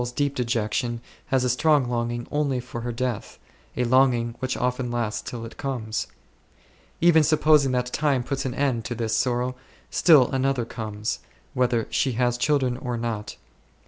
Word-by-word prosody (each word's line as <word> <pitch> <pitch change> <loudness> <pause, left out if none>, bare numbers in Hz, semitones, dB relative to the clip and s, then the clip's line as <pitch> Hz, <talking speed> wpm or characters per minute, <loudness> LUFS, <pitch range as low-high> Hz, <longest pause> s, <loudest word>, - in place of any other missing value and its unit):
soul's 120 0 -3
deep 145 +1 0
dejection 120 -1 -1 0.3
has 130 -1 +2
a 125 - +1
strong 145 +1 +3
longing 120 0 -2
only 145 -3 0
for 120 -1 -7
her 120 +1 -3
death, 120 -2 -3 0.4
a 125 - +2
longing 120 -1 +3
which 130 0 -2
often 125 0 -1
lasts 115 -3 -2
till 115 -2 -6
it 115 - -11
comes. 120 -6 -3 0.9
Even 170 -1 +6
supposing 150 -2 +4
that 125 -1 +1
time 140 -4 +1
puts 135 +2 -3
an 130 -1 -3
end 135 -5 0
to 120 - -4
this 115 -1 -1
sorrow, 125 +1 0 0.4
still 150 -8 +5
another 130 -2 0
comes, 110 -2 -4 0.3
whether 125 -3 +1
she 130 - +1
has 120 +1 +1
children 130 -3 +1
or 125 -3 -3
not. 115 -3 -4
125 Hz, 165 wpm, -25 LUFS, 120-135 Hz, 0.9 s, Even